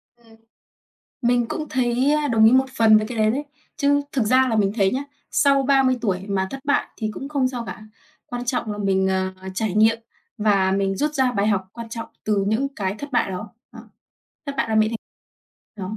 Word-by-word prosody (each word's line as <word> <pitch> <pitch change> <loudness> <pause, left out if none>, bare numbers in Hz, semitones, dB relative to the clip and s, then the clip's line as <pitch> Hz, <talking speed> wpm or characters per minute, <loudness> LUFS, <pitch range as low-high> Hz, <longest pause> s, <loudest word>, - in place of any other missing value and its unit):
Ừm. 230 -2 -21 0.9
Mình 240 0 +2
cũng 310 -2 -4
thấy, 255 +2 +1
ơ, 300 -1 +1
đồng 225 -2 +4
ý 220 - +7
một 260 +1 +4
phần 220 -1 +6
với 215 - +1
cái 235 0 -6
đấy 215 0 +3
đấy. 275 +6 -2 0.3
Chứ 285 -1 +2
thực 260 - +1
ra 255 +3 +4
là 225 - 0
mình 200 -2 +2
thấy 195 -3 +3
nhá, 265 - -1 0.3
sau 275 -2 +3
30 265 -2 +3
tuổi 195 -4 -2
mà 190 -1 0
thất 270 - -6
bại 285 0 +1
thì 215 -2 -3
cũng 275 - -7
không 275 -3 +1
sao 245 -2 -5
cả. - - -8 0.4
Quan 245 0 -5
trọng 240 -3 -2
là 205 - -7
mình, 190 -1 +1
ờ, 190 0 -1 0.2
trải 210 -1 -1
nghiệm 220 +2 +4 0.4
và 200 -3 +2
mình 195 0 0
rút 300 +5 0
ra 260 -3 +2
bài 200 -1 0
học 195 -3 0
quan 230 -1 -8
trọng 230 0 -6 0.2
từ 205 -2 +1
những 245 +6 0
cái 195 -2 -2
thất 285 -1 -8
bại 240 - +1
đó. 195 +3 -5 0.2
Đó. - - -10 0.7
Thất 280 - -4
bại - - 0
là 220 - 0
mẹ 215 0 +4 0.7
thành 210 -1 -8
225 Hz, 220 wpm, -22 LUFS, 205-260 Hz, 0.9 s, ý